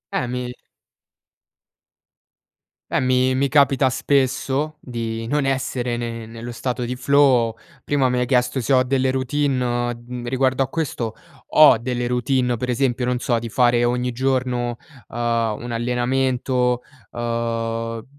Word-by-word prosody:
Eh, 125 - 0
mi 125 0 -4 2.4
eh - - +2
mi 130 0 +2
mi 135 +2 +1
capita 140 -2 +4
spesso 135 +3 0
di 115 -2 -4
non 145 +1 0
essere 130 -2 -1
ne 115 -1 -5
nello 115 +2 -8
stato 125 +1 -3
di 125 +1 -3
flow. 130 -4 +3 0.3
Prima 135 -3 +1
mi 125 - 0
hai 125 - +1
chiesto 125 +1 +1
se 135 - 0
ho 130 0 +5
delle 130 0 +1
routine, 130 0 0
o 120 0 0 0.2
m 125 -1 -6
d - - -6
riguardo 130 +1 +1
a - - -3
questo 120 -8 -3 0.4
ho 150 -6 +8
delle 120 +1 -2
routine, 125 +1 +1
uhm, 120 - 0
per 125 +2 -4
esempio, 125 0 0
non 125 0 0
so, 120 -1 0
di 115 0 -6
fare 120 0 +3
ogni 125 +1 0
giorno, 125 -1 -1 0.3
uhm, 120 - -9 0.5
un 120 - -5
allenamento, 125 +1 0 0.3
uhm, 115 -1 -3
125 Hz, 150 wpm, -21 LUFS, 120-130 Hz, 2.4 s, ho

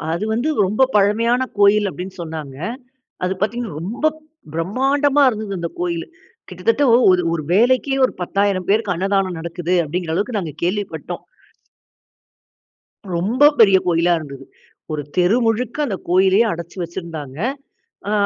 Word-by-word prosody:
அது 170 +6 -1
வந்து 240 +7 0 0.2
ரொம்ப 215 +7 +1
பழமையான 230 +5 +2
கோவில் 205 0 +4
அப்படினு 185 +1 -7
சொன்னாங்க. 155 -5 -7 0.7
அது 185 - 0
பார்த்தீங்கனா, 215 -4 -2
ரொம்ப 225 - -3 0.5
பிரமாண்டமா 270 - +2
இருந்தது 215 -4 -4
அந்த 170 - -3
கோயில். 170 -2 -2 0.4
கிட்டத்தட்ட 460 -11 0 0.3
ஒரு 180 - +3
ஒரு 165 -2 -1
வேலைக்கே 255 +5 +3
ஒரு - - -4
10,000 195 0 0
பேருக்கு 210 -2 +2
அன்னதானம் 190 -1 0
நடக்குது 170 +1 -3
அப்படிங்குற 165 +1 -3
அளவுக்கு 210 +6 -1
நாங்க 160 -6 -5
கேள்விப்பட்டோம். 200 +3 -3 1.9
ரொம்ப 240 +12 +4
பெரிய 195 -3 +7
கோயிலா 175 0 +2
இருந்தது. 140 -3 -9 0.5
ஒரு 150 - -2
தெரு 180 +6 +3
முழுக்க 230 +2 0
அந்த 200 - -3
கோயிலையே 190 +4 +4
அடைச்சு 170 +2 -7
வச்சிருந்தாங்க. 165 -5 -7 0.7
அ - - -1
195 Hz, 130 wpm, -20 LUFS, 170-225 Hz, 1.9 s, பெரிய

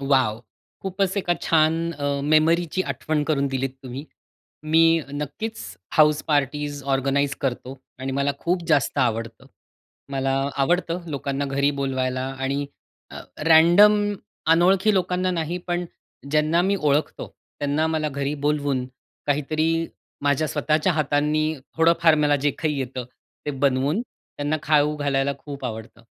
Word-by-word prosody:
Wow! 130 -5 +1 0.4
खूपच 190 +1 -1
एका 175 -3 +1
छान, 165 +1 +2
अ 145 -3 -4 0.2
मेमरीची 165 +4 +2
आठवण 150 +3 -2
करून 140 -2 +1
दिलीत 135 0 -2
तुम्ही. 130 +3 -7 0.6
मी 165 +1 +4
नक्कीच, 150 +10 -5 0.3
हाऊस 150 -1 +4
पार्टीज 145 0 0
ऑर्गनाइज 140 +1 0
करतो. 130 0 -3 0.2
आणि 135 +1 -4
मला 140 +1 0
खूप 175 +3 -1
जास्त 145 -2 +2
आवडतं. 115 0 -1 0.6
मला 135 -1 -1 0.3
आवडतं 175 +3 0
लोकांना 140 0 -2
घरी 140 +1 +1
बोलवायला 130 -1 -1 0.2
आणि 140 +2 -2 0.4
अ - - -8 0.3
रॅन्डम 170 +6 +7 0.6
अनोळखी 190 +5 +4
लोकांना 185 0 0
नाही, 170 0 -2
पण 175 0 -1 0.5
ज्यांना 155 +3 +2
मी 195 +2 +1
ओळखतो 150 -3 0 0.3
त्यांना 145 +2 0
मला 155 -1 -1
घरी 140 0 -2
बोलवून; 145 -3 0 0.4
काहीतरी 150 +2 0 0.5
माझ्या 145 +2 +2
स्वतःच्या 155 +4 +1
हातांनी 150 0 +1 0.3
थोडंफार 165 0 +4
मला 145 -1 +3
जे 145 - +4
काही 150 -3 -1
येतं, 130 -1 -4 0.4
ते - - 0
बनवून 140 - +1
त्यांना 150 -10 -5
खाऊ 150 0 +2
घालायला 140 -1 0
खूप 140 -2 -9
आवडतं. 110 0 -7
150 Hz, 130 wpm, -23 LUFS, 135-165 Hz, 0.6 s, रॅन्डम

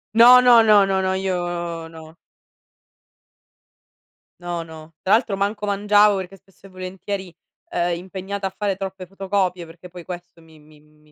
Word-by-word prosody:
No, 245 +2 +8
no, 240 -2 +7
no, 210 -3 +5
no, 190 -1 0
no, 190 0 0
io 175 -3 -3
no. 160 0 -13 2.2
No, 175 -1 -4
no, 160 0 -13
tra 190 - +1
l'altro 215 -3 +2
manco 205 +1 -2
mangiavo 205 0 +3
perché 190 +1 -7
spesso 195 +1 -25
e - - -13
volentieri, 185 0 -7 0.4
ehm, 175 0 -1
impegnata 190 +2 -5
a 190 - -9
fare 205 -2 -1
troppe 190 -1 -7
fotocopie, 190 -2 -2
perché 170 +2 -14
poi 175 -1 -11
questo 175 -1 -10
mi 160 -1 -19
mi 150 0 -20
mi 150 0 -27
185 Hz, 155 wpm, -21 LUFS, 170-200 Hz, 2.2 s, No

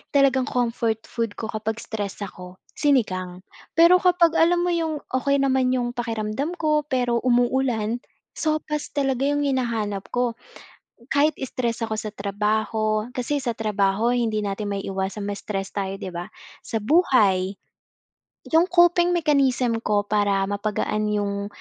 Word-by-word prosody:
talagang 270 -2 +4
comfort 230 -3 -1
food 230 -3 -4
ko 220 - -5
kapag 220 +1 -3
stress 205 -2 -5
ako, 180 -1 -9 0.2
sinigang. 185 -11 0 0.3
Pero 340 +2 +7
kapag 355 -2 +4
alam 345 +1 +4
mo 355 - +1
yung 320 -3 -1
okey 280 +2 +1
naman 260 -1 +2
yung 240 -1 -1
pakiramdam 235 +6 -3
ko, 305 -3 +1
pero 245 -4 +1
umuulan, 245 -2 +1 0.3
sopas 305 -1 -2
talaga 270 -1 +1
yung 290 0 +1
hinahanap 230 -7 -1
ko. 245 -2 0 0.8
Kahit 295 +2 +3
stress 235 -3 -2
ako 220 - -3
sa 215 -1 -5
trabaho 215 +1 -1
kasi 260 +4 -1
sa 240 -4 -2
trabaho 215 +1 +1
hindi 225 -3 0
natin 205 +1 -3
maiiwasan 195 +1 -3
ma-stress 200 -1 -4
tayo 195 -1 -3
di 190 - -5
ba? 175 0 -5 0.4
Sa 225 - -2
buhay. 210 - +3 1.0
Yung 330 +2 +5
coping 350 0 +4
mechanism 265 -7 +2
ko 210 -2 +1
para 205 -1 +1
mapagaan 210 +1 -1
yung, 200 -1 -1
230 Hz, 135 wpm, -23 LUFS, 205-280 Hz, 1.0 s, Pero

